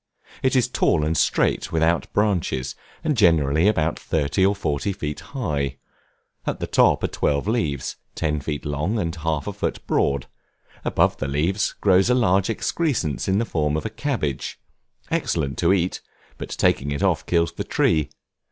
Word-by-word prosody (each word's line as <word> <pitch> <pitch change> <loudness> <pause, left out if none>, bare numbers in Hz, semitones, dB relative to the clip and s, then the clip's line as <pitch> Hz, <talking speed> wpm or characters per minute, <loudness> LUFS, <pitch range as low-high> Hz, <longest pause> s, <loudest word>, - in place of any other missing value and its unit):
It 130 0 +2
is 125 -2 +3
tall 80 -10 +2
and 80 +1 0
straight, - - +1
without 80 +1 +1
branches, 95 -11 0 0.3
and 155 -2 +1
generally 80 - +4
about 80 -6 +1
thirty 75 +3 0
or 100 +2 +3
forty 95 -1 -1
feet 75 -4 -4
high; 75 - -3 0.7
at - - -1
the - - -2
top - - +3
are - - +2
twelve 70 +5 0
leaves, 80 - -1 0.2
ten 75 -2 0
feet 75 +1 -4
long, 75 +9 -1
and 85 -5 -2
half 80 -2 -1
a - - -4
foot - - -3
broad; 70 -2 +1 0.6
above - - +2
the - - -3
leaves, 80 +9 0
grows 95 +2 +4
a 125 - +4
large 100 -4 +3
excrescence 115 - -1
in 95 - +2
the 115 - +1
form 75 -6 0
of - - -4
a 110 - -3
cabbage, 110 - -3 0.5
excellent 70 -1 -1
to 85 +1 +3
eat, 90 -2 0 0.4
but - - -6
taking 70 - +1
it 70 0 -2
off - - +2
kills 85 -1 +2
the - - -4
tree. 80 -3 +1
85 Hz, 170 wpm, -23 LUFS, 75-100 Hz, 0.7 s, generally